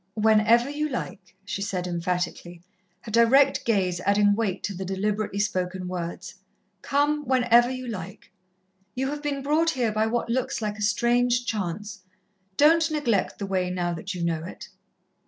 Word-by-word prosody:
"Whenever 220 +2 +4
you 300 +2 -2
like," 195 -8 -6
she 195 - -4
said 185 -3 -2
emphatically, 175 0 -3 0.4
her 220 - -9
direct 235 +5 +4
gaze 185 -6 +1
adding 205 +2 +3
weight 200 -3 -2
to 205 - -3
the 190 +1 -5
deliberately 200 +2 -2
spoken 185 -3 -2
words. 175 -2 -5 0.5
"Come 295 +1 +1
whenever 245 -2 +4
you 255 -1 -5
like. 195 -4 -8 0.6
You 265 +1 -1
have 295 0 -5
been 285 -2 -3
brought 310 +4 +2
here 250 -8 0
by 215 +1 +1
what 235 +1 -1
looks 260 +3 -1
like 210 -1 -4
a - - -6
strange 240 +4 +2
chance. 205 0 -4 0.6
Don't 320 +2 +5
neglect 280 -11 0
the 200 - -4
way 185 -2 -1
now 175 -1 -2
that 180 +4 -6
you 175 - -4
know 165 -2 -1
it." 180 - -9
215 Hz, 160 wpm, -25 LUFS, 185-245 Hz, 0.6 s, Don't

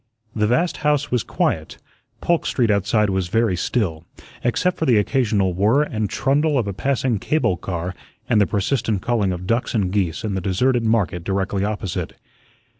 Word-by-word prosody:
The 105 -1 +2
vast 165 +10 +1
house 150 -1 0
was 125 -2 +2
quiet; - - -2 0.4
Polk 170 -1 +1
Street 120 -4 +2
outside 105 +1 +2
was 95 -2 -1
very 110 0 +1
still, 85 -5 -1 0.4
except 175 +9 0
for 160 - 0
the 120 -4 +5
occasional 105 -4 +1
whirr 110 +11 +3
and 110 -7 -2
trundle 140 +5 +1
of 120 - +1
a 100 - -3
passing 130 +1 0
cable 150 -6 +1
car 90 0 -4 0.3
and 110 -3 +3
the 100 - +3
persistent 105 -1 -1
calling 110 -6 +1
of 90 0 -5
ducks 115 +5 0
and 95 -4 +1
geese 95 -5 -1
in 105 -2 -2
the 95 - -2
deserted 120 +7 +1
market 105 -6 +1
directly 95 +1 -1
opposite. 105 -3 -3
105 Hz, 175 wpm, -21 LUFS, 95-125 Hz, 0.4 s, the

